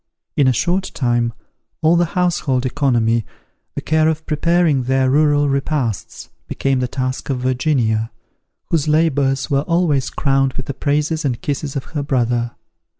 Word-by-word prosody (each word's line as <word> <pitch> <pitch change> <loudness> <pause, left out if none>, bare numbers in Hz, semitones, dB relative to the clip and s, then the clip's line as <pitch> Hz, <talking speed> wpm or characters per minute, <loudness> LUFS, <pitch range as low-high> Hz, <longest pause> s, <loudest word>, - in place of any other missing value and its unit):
In 140 - +3
a - - +5
short 180 +9 0
time, 120 -3 +1 0.5
all 160 +2 +5
the 175 +2 0
household 150 -8 +1
economy, 120 -4 +1 0.5
the - - -3
care 155 0 +2
of 160 0 -3
preparing 160 -3 +1
their 130 0 +2
rural 145 0 +3
repasts, 135 - -2 0.2
became 135 -1 0
the 125 - 0
task 130 +1 -3
of 135 - 0
Virginia, 125 -4 0 0.6
whose 160 -3 +1
labours 145 -3 +1
were 140 0 +3
always 155 -4 +1
crowned 135 -2 +1
with 130 - -5
the 140 - -4
praises 150 +4 -1
and 125 -5 -1
kisses 140 +1 -3
of 135 - -2
her 150 - -1
brother. 120 -4 0
140 Hz, 150 wpm, -19 LUFS, 130-155 Hz, 0.6 s, a